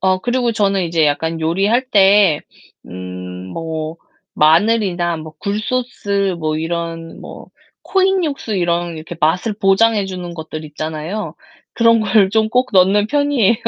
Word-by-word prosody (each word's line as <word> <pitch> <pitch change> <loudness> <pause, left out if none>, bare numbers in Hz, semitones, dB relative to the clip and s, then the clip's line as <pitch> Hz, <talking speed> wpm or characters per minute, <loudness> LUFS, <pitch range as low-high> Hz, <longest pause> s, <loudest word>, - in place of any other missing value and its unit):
어 185 0 +2
그리고 245 +1 0
저는 200 -3 +1
이제 165 -2 +1
약간 160 +3 -1
요리할 195 +10 +1
때 195 -6 +5 0.5
음 90 0 -7 0.2
뭐 160 -1 -4 0.4
마늘이나 175 +1 +2
뭐 155 0 -9
굴소스 205 -2 -2
뭐 155 -1 -1
이런 165 0 -5
뭐 - - -10 0.4
코인 385 -1 +1
육수 275 -8 -3
이런 175 -1 -1
이렇게 160 +2 -8
맛을 180 +8 +1
보장해 205 +1 +2
주는 180 -2 -6
것들 160 -1 -7
있잖아요. 155 +6 -5 0.4
그런 230 -1 +4
걸 210 -2 +3
좀 220 +1 +2
꼭 250 +2 +1
넣는 195 +2 +4
편이예요. 280 -4 +2
190 Hz, 270 characters per minute, -17 LUFS, 160-220 Hz, 0.5 s, 때